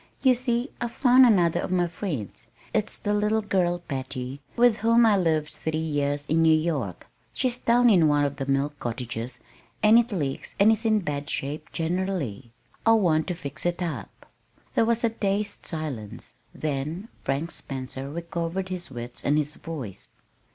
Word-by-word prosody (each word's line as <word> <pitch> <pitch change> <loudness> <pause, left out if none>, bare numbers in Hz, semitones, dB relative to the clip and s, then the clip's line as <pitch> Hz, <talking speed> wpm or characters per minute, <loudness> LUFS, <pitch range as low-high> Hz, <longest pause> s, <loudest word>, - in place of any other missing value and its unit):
You 260 -2 +6
see 245 +1 -1
I've 240 -1 -2
found 255 -1 +6
another 175 -7 +3
of - - -3
my 180 -1 +2
friends. 165 - -5 0.3
It's 215 -1 -1
the 205 - -1
little 210 +1 +1
girl, 180 -4 +1
Patty, 130 -1 -4
with 240 -2 +5
whom 230 +2 +4
I 215 -2 +5
lived 160 -5 +1
three 160 0 -3
years 145 -2 -1
in 160 +2 +2
New 160 -1 +6
York. 145 - -2 0.3
She's 250 -2 0
down 245 +1 +4
in 180 -8 +6
one 145 -1 +3
of 140 0 -3
the 135 -1 -4
mill 140 +2 +1
cottages, 120 +1 -4 0.4
and 215 +2 +8
it 240 0 0
leaks 145 -9 -3
and 205 +3 +7
is 225 +1 0
in 215 -1 +3
bad 145 -4 -4
shape 150 +3 -3
generally. 165 - -2 0.3
I 225 - +5
want 170 -8 +3
to 180 - -2
fix 140 -5 -7
it 175 +1 -1
up." 140 - -6 0.5
There 225 - +3
was 235 +1 +2
a 230 - +4
dazed 205 -1 -2
silence; 145 - -4 0.2
then 155 +8 -3
Frank 145 +5 -1
Spencer 135 0 -6
recovered 170 +3 -3
his 180 -3 -5
wits 120 -1 -7
and 145 +2 +2
his 150 0 0
voice. 140 - -6
165 Hz, 170 wpm, -26 LUFS, 140-210 Hz, 0.5 s, and